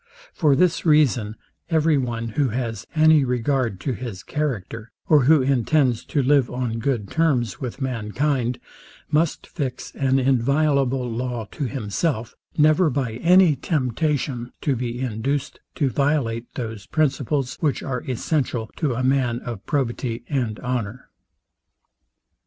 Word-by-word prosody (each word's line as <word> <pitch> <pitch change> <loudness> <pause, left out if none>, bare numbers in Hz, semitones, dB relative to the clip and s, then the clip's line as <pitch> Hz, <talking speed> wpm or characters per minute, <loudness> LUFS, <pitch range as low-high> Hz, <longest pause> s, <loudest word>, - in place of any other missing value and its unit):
For 150 -5 +3
this 180 +3 +2
reason, 135 -9 +3 0.3
every 160 -1 +3
one, 120 -4 -2
who 135 +4 0
has 115 -2 -4
any 155 -1 +6
regard 125 -4 0
to 135 - -1
his 115 -5 -6
character, 115 - -3 0.2
or 150 -5 +5
who 150 -1 +5
intends 130 -1 +2
to 145 - 0
live 140 -1 +3
on 125 -2 -3
good 115 -4 -1
terms 145 -8 +1
with 125 0 -5
mankind, 125 +1 -1 0.5
must 155 +1 +1
fix 130 -3 -5
an 135 -1 +1
inviolable 135 0 +2
law 120 -1 -3
to 145 - -3
himself, 120 - -2 0.2
never, 155 +3 +4
by 130 -4 -1
any 175 +1 +5
temptation, 130 -3 -1
to 140 - +1
be 120 0 -3
induced 130 +3 -2 0.2
to 140 -4 +1
violate 120 -4 0
those 110 -5 -5
principles, 140 -3 0
which 150 -4 0
are 125 -2 -3
essential 125 -3 -1
to 145 -7 0
a 130 - -2
man 130 -3 +1
of 115 -5 -6
probity 120 -3 -2
and 120 -7 -2
honour. 125 -2 -4
130 Hz, 135 wpm, -23 LUFS, 120-145 Hz, 0.5 s, any